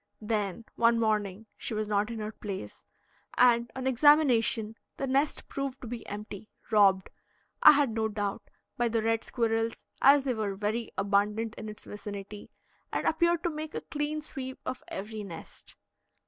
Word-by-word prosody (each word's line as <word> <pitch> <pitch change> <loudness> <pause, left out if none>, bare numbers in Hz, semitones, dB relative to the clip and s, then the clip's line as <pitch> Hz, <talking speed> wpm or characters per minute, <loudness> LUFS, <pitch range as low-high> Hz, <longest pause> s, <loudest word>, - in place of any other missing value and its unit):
Then 210 -1 -2
one 230 0 +4
morning 215 -2 0
she 225 - -4
was 215 0 -1
not 205 +1 +1
in 230 - -5
her 215 0 -4
place, 195 - -7 0.5
and 240 -1 +5
on 260 0 -4
examination 250 -5 +4 0.2
the 275 - -1
nest 275 +3 0
proved 275 -1 -4
to 245 - -7
be 235 0 -6
empty 210 0 -7 0.2
robbed, 195 -3 +4 0.5
I 305 - +10
had 285 -4 +2
no 220 0 0
doubt, 205 0 -4 0.3
by 240 - +2
the 225 -1 0
red 225 0 +1
squirrels, 225 -1 -1 0.2
as 280 0 +7
they 265 -2 0
were 210 -3 -2
very 220 +3 -2
abundant 205 +3 +1
in 215 - -7
its 210 - -11
vicinity, 205 0 -8 0.4
and - - -2
appeared 340 +1 +2
to 345 - 0
make 310 +1 -6
a - - -2
clean 300 +1 -3
sweep 260 -3 -6
of 255 - -4
every 210 +2 -5
nest. 185 -5 -10
225 Hz, 165 wpm, -29 LUFS, 210-260 Hz, 0.5 s, I